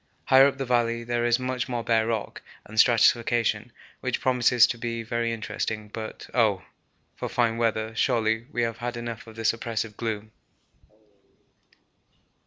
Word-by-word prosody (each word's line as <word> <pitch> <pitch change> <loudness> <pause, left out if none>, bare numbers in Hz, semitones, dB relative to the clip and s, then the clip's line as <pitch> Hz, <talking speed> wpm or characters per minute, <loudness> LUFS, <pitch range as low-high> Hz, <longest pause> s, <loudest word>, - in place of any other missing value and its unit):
Higher 135 +1 +7
up 140 - -2
the 135 - -3
valley 120 -1 +1
there 120 0 -1
is 120 0 +3
much 130 0 -3
more 120 -2 -2
bare 115 -1 +2
rock 115 -1 -3 0.2
and 110 +1 -4
stratification, 120 0 +3 0.3
which - - -2
promises 125 -1 +4
to 120 - -3
be 115 -1 -3
very 115 +1 -1
interesting, 110 -1 -4
but 110 0 -7
oh! 110 -6 +2 0.5
for - - -5
fine 115 -2 +1
weather; 110 -1 -1
surely 110 -1 +1
we 120 - 0
have 115 -1 -2
had 120 0 -4
enough 120 -1 -6
of 110 - -12
this 115 0 +1
oppressive 115 -2 -4
gloom. 110 -2 -4
115 Hz, 155 wpm, -26 LUFS, 110-120 Hz, 0.5 s, Higher